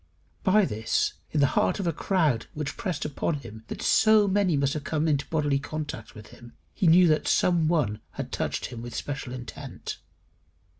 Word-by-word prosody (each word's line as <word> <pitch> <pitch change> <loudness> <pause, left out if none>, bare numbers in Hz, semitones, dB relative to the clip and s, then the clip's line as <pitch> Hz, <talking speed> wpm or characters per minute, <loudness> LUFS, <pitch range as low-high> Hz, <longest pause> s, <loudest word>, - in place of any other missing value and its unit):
By 205 +2 +4
this, 110 -6 0 0.2
in 150 - 0
the - - +6
heart - - +2
of 195 - -2
a 170 - +1
crowd 155 - +1
which 150 -2 -4
pressed 180 -7 -3
upon 150 +2 -1
him 115 -6 -9 0.2
so 215 -1 +5
that 195 - 0
many 190 -6 +2
must 140 0 +1
have 150 - -4
come 155 +1 0
into 145 -3 +1
bodily 145 -3 +1
contact 145 -6 -6
with 105 0 -11
him, 120 0 -14 0.2
he 185 - +1
knew 175 +2 +7
that 155 -1 +2
some 170 -3 +3
one 135 -11 0
had - - -6
touched - - -2
him 115 -2 -7
with 120 -1 -7
special 135 -3 -4
intent. 125 -1 -7
150 Hz, 190 wpm, -27 LUFS, 125-170 Hz, 0.2 s, knew